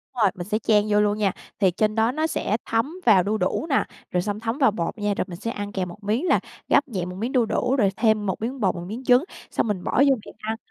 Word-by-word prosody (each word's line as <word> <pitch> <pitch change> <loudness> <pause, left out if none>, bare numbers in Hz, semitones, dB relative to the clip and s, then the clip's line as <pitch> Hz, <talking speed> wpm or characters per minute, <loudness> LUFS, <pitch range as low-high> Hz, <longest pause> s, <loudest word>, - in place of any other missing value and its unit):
Đúng 240 - -2
rồi, 195 - +4
mình 175 0 -6
sẽ 215 +1 0
chan 210 -2 +3
vô 210 0 +4
luôn 210 0 +1
nha. 205 -3 +2 0.3
Thì 190 -3 +4
trên 215 +4 0
đó 225 +1 +3
nó 310 +4 0
sẽ 215 -8 -1
thấm 230 +8 0
vào 195 -6 +6
đu 210 +3 0
đủ 185 +9 -1
nè, 275 - +3 0.3
rồi 180 - +1
xong 205 +2 -3
thấm 225 +2 -2
vào 270 -6 +4
bột 170 -2 -3
nha, 205 -1 0
rồi - - 0
mình 175 -2 -8
sẽ 230 - -3
ăn 205 -2 -5
kèm 190 -2 -2
một 205 +4 -12
miếng 220 - 0
là - - +4 0.3
gắp 285 - +3
nhẹ 190 -8 -3
một 180 - -7
miếng 230 +7 -3
đu 250 -3 +3
đủ, 250 +4 0
rồi 210 -7 +3
thêm 220 -2 +2
một 190 0 -2
miếng 250 +4 -3
bột, 195 -5 +1
một 175 0 -6
miếng 230 +6 -6
trứng, 250 +2 +5 0.3
xong - - 0
mình 195 -4 -2
bỏ - - -2 0.2
vô 270 - +5
miệng - - -12
ăn. 220 +1 -3
215 Hz, 290 wpm, -24 LUFS, 200-235 Hz, 0.3 s, vào